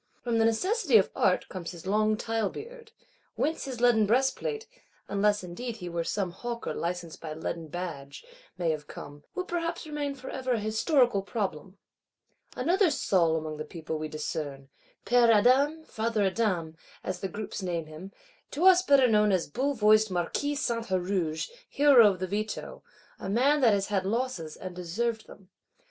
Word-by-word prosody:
From 235 Hz, -2 st, 0 dB
the 225 Hz, -, +4 dB
necessities 315 Hz, -, +3 dB
of 195 Hz, -, +2 dB
Art 185 Hz, -, +2 dB
comes 175 Hz, -3 st, -6 dB
his 170 Hz, -1 st, -10 dB
long 215 Hz, +2 st, +2 dB
tile 225 Hz, -3 st, -1 dB
beard; 465 Hz, -, -10 dB, 0.4 s
whence 315 Hz, 0 st, -1 dB
his 260 Hz, -3 st, -6 dB
leaden 235 Hz, -3 st, +4 dB
breastplate 270 Hz, -, 0 dB, 0.4 s
(unless 205 Hz, 0 st, +1 dB
indeed 220 Hz, +7 st, -6 dB
he 180 Hz, -4 st, -6 dB
were 170 Hz, 0 st, -2 dB
some 185 Hz, +2 st, -2 dB
Hawker 235 Hz, +6 st, -5 dB
licensed 170 Hz, -1 st, -4 dB
by 155 Hz, -2 st, -6 dB
leaden 160 Hz, 0 st, -4 dB
badge) 155 Hz, -, -7 dB, 0.3 s
may 170 Hz, -2 st, +1 dB
have 150 Hz, -1 st, -5 dB
come,—will 145 Hz, -, -8 dB
perhaps 340 Hz, -2 st, -3 dB
remain 295 Hz, -2 st, -3 dB
for 265 Hz, -, -8 dB
ever 260 Hz, -1 st, -1 dB
a 230 Hz, -, 0 dB
Historical 220 Hz, +1 st, +2 dB
Problem. 195 Hz, -3 st, -4 dB, 0.8 s
Another 355 Hz, +8 st, +3 dB
Saul 175 Hz, -, +2 dB
among 155 Hz, -1 st, -5 dB
the 155 Hz, -, -4 dB
people 160 Hz, -1 st, -6 dB
we 155 Hz, -, -3 dB
discern: 150 Hz, -3 st, -5 dB, 0.4 s
"Père 240 Hz, -1 st, +5 dB
Adam, 270 Hz, +8 st, +4 dB
Father 220 Hz, -5 st, -1 dB
Adam," 185 Hz, -5 st, 0 dB, 0.3 s
as 185 Hz, -1 st, -4 dB
the 195 Hz, -, -2 dB
groups 205 Hz, +2 st, -6 dB
name 170 Hz, -3 st, -2 dB
him; 155 Hz, +5 st, -10 dB, 0.4 s
to 325 Hz, +6 st, -1 dB
us 370 Hz, -1 st, +8 dB
better 280 Hz, -7 st, +5 dB
known 210 Hz, -2 st, +4 dB
as 185 Hz, -3 st, +1 dB
bull 270 Hz, -, -1 dB
voiced 215 Hz, -1 st, +4 dB
Marquis 185 Hz, +11 st, -1 dB
Saint 235 Hz, -5 st, -2 dB
Huruge; 180 Hz, -4 st, -1 dB, 0.2 s
hero 275 Hz, -7 st, +6 dB
of 190 Hz, -, -2 dB
the 185 Hz, -, -2 dB
Veto; 210 Hz, +3 st, -4 dB, 0.4 s
a 190 Hz, -, -5 dB
man 275 Hz, +8 st, +3 dB
that 225 Hz, -5 st, +5 dB
has 200 Hz, 0 st, -2 dB
had 195 Hz, -2 st, 0 dB
losses, 220 Hz, -8 st, -2 dB
and 185 Hz, -1 st, -7 dB
deserved 220 Hz, +6 st, -2 dB
them. 195 Hz, -1 st, -15 dB
210 Hz, 170 wpm, -28 LUFS, 175-255 Hz, 0.8 s, us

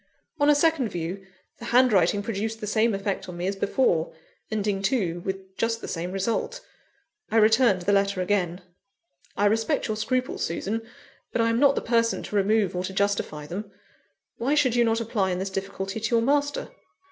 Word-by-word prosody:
On 290 Hz, 0 st, +4 dB
a 295 Hz, -, +6 dB
second 290 Hz, -5 st, +2 dB
view, 180 Hz, +3 st, -5 dB, 0.3 s
the 235 Hz, -, -8 dB
handwriting 210 Hz, -6 st, +3 dB
produced 225 Hz, +1 st, -3 dB
the 210 Hz, -, -5 dB
same 215 Hz, +1 st, +2 dB
effect 195 Hz, -1 st, -3 dB
on 175 Hz, -, -7 dB
me 175 Hz, -, -3 dB
as 195 Hz, +1 st, -1 dB
before, 195 Hz, -5 st, +1 dB, 0.4 s
ending 205 Hz, -2 st, -1 dB
too 195 Hz, -5 st, 0 dB
with 190 Hz, 0 st, -6 dB
just 230 Hz, 0 st, 0 dB
the -, -, -7 dB
same 175 Hz, +1 st, -4 dB
result. 225 Hz, -, -2 dB, 0.7 s
I 225 Hz, -, +1 dB
returned 220 Hz, -3 st, +4 dB
the 200 Hz, -, +1 dB
letter 200 Hz, -1 st, +2 dB
again. 180 Hz, -1 st, 0 dB, 0.8 s
"I 205 Hz, -, +2 dB
respect 220 Hz, +2 st, +1 dB
your 215 Hz, -, -1 dB
scruples, 255 Hz, +4 st, -1 dB
Susan, 205 Hz, +7 st, -2 dB, 0.5 s
but -, -, -2 dB
I 230 Hz, 0 st, +3 dB
am 230 Hz, -, +1 dB
not 280 Hz, 0 st, +5 dB
the -, -, -1 dB
person 230 Hz, -1 st, +1 dB
to -, -, -6 dB
remove 200 Hz, -1 st, +2 dB
or 180 Hz, -, -1 dB
to 190 Hz, -, -5 dB
justify 195 Hz, -7 st, -1 dB
them. 195 Hz, +7 st, -6 dB, 0.7 s
Why 270 Hz, +6 st, +1 dB
should 260 Hz, -5 st, +3 dB
you 240 Hz, -, +4 dB
not 225 Hz, 0 st, +1 dB
apply 215 Hz, -4 st, 0 dB
in 180 Hz, -, -1 dB
this 190 Hz, +1 st, -3 dB
difficulty 195 Hz, +1 st, -4 dB
to 220 Hz, +2 st, 0 dB
your 230 Hz, -, +3 dB
master?" 285 Hz, +2 st, 0 dB
210 Hz, 190 wpm, -25 LUFS, 190-230 Hz, 0.8 s, a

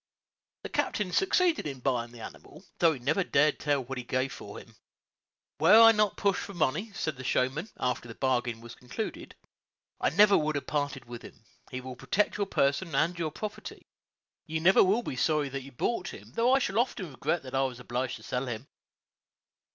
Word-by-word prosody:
The -, -, -5 dB
captain 205 Hz, -4 st, -1 dB
succeeded 365 Hz, -, +2 dB
in 135 Hz, -3 st, -6 dB
buying 120 Hz, -2 st, -1 dB
the 120 Hz, -1 st, -12 dB
animal, 185 Hz, -, -11 dB
though 165 Hz, -3 st, +5 dB
he -, -, -6 dB
never 145 Hz, +10 st, 0 dB
dared 150 Hz, -3 st, +2 dB
to -, -, -11 dB
tell 145 Hz, -2 st, +2 dB
what 130 Hz, +1 st, -5 dB
he -, -, -5 dB
gave 130 Hz, +2 st, -1 dB
for -, -, -9 dB
him. -, -, -13 dB, 0.8 s
"Were 175 Hz, +8 st, +7 dB
I 225 Hz, 0 st, +10 dB
not 210 Hz, -2 st, +1 dB
pushed 200 Hz, -2 st, +1 dB
for 200 Hz, -, -8 dB
money," 170 Hz, +7 st, 0 dB
said 155 Hz, -7 st, -3 dB
the 130 Hz, -, -8 dB
showman, 130 Hz, -, 0 dB
after 125 Hz, -1 st, -2 dB
the 115 Hz, -, -9 dB
bargain 120 Hz, -3 st, -1 dB
was 120 Hz, 0 st, -10 dB
concluded, 125 Hz, -, -6 dB, 0.6 s
"I -, -, +2 dB
never 200 Hz, +5 st, +6 dB
would 155 Hz, 0 st, +1 dB
have 145 Hz, -, -3 dB
parted 145 Hz, -3 st, -2 dB
with 120 Hz, 0 st, -9 dB
him; -, -, -14 dB, 0.2 s
he 130 Hz, -, -5 dB
will 130 Hz, 0 st, -8 dB
protect 205 Hz, +11 st, 0 dB
your 200 Hz, -1 st, -1 dB
person 160 Hz, +1 st, 0 dB
and 170 Hz, +2 st, +1 dB
your 160 Hz, -2 st, -1 dB
property; 205 Hz, +7 st, -7 dB, 0.6 s
you 160 Hz, 0 st, -2 dB
never 185 Hz, +4 st, +6 dB
will 210 Hz, +6 st, +2 dB
be -, -, -4 dB
sorry 150 Hz, +1 st, +1 dB
that 135 Hz, 0 st, -4 dB
you 135 Hz, +1 st, -12 dB
bought 230 Hz, -, -2 dB
him, -, -, -12 dB
though 235 Hz, +2 st, +2 dB
I 265 Hz, -, +6 dB
shall 225 Hz, -5 st, 0 dB
often 195 Hz, -, -1 dB
regret 150 Hz, +5 st, -1 dB
that 130 Hz, -, -10 dB
I 135 Hz, -, +2 dB
was 130 Hz, -2 st, -2 dB
obliged 125 Hz, +1 st, -3 dB
to -, -, -13 dB
sell 125 Hz, +1 st, -3 dB
him." 120 Hz, +2 st, -5 dB
145 Hz, 205 wpm, -29 LUFS, 130-190 Hz, 0.8 s, I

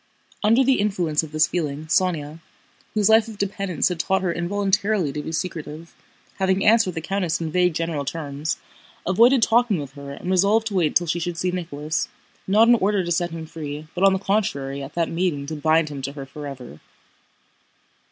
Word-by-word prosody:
Under 230 Hz, +5 st, +5 dB
the 265 Hz, 0 st, +3 dB
influence 180 Hz, -7 st, +1 dB
of 160 Hz, -2 st, -9 dB
this 155 Hz, +1 st, +3 dB
feeling 155 Hz, -3 st, -3 dB
Sónya, 160 Hz, -2 st, 0 dB, 0.6 s
whose 210 Hz, -2 st, +3 dB
life 220 Hz, 0 st, +5 dB
of 220 Hz, -2 st, -9 dB
dependence 195 Hz, -4 st, -1 dB
had 180 Hz, -2 st, -4 dB
taught 190 Hz, +3 st, +1 dB
her 175 Hz, -2 st, 0 dB
involuntarily 195 Hz, -1 st, 0 dB
to 150 Hz, -, -3 dB
be 160 Hz, -, -6 dB
secretive, 160 Hz, -1 st, -5 dB, 0.5 s
having 190 Hz, 0 st, +1 dB
answered 215 Hz, -5 st, +4 dB
the 165 Hz, -, -3 dB
countess 180 Hz, -1 st, -1 dB
in 160 Hz, -2 st, -3 dB
vague 180 Hz, -1 st, +2 dB
general 165 Hz, -3 st, -2 dB
terms, 145 Hz, 0 st, -3 dB, 0.5 s
avoided 235 Hz, +6 st, +5 dB
talking 230 Hz, -3 st, +3 dB
with 140 Hz, -2 st, -6 dB
her 140 Hz, 0 st, -9 dB
and 175 Hz, +6 st, -5 dB
resolved 200 Hz, +4 st, +3 dB
to 220 Hz, -, -3 dB
wait 175 Hz, -5 st, +1 dB
till 175 Hz, -, +4 dB
she 170 Hz, +1 st, -1 dB
should 175 Hz, 0 st, -3 dB
see 180 Hz, +1 st, 0 dB
Nicholas, 160 Hz, -3 st, -3 dB, 0.4 s
not 215 Hz, +4 st, +5 dB
in 240 Hz, -, +7 dB
order 205 Hz, -3 st, +2 dB
to 175 Hz, -, -4 dB
set 175 Hz, +1 st, +1 dB
him 165 Hz, -1 st, -7 dB
free 155 Hz, -2 st, -7 dB
but 180 Hz, -, -2 dB
on 195 Hz, -1 st, +6 dB
the -, -, +1 dB
contrary 145 Hz, -9 st, -1 dB
at 135 Hz, +1 st, -9 dB
that 170 Hz, -1 st, +1 dB
meeting 165 Hz, -5 st, -1 dB
to 155 Hz, +2 st, -5 dB
bind 155 Hz, +1 st, +2 dB
him 140 Hz, -2 st, -6 dB
to 140 Hz, +1 st, -4 dB
her 140 Hz, -2 st, -7 dB
forever. 135 Hz, -, -9 dB
170 Hz, 195 wpm, -23 LUFS, 150-195 Hz, 0.6 s, in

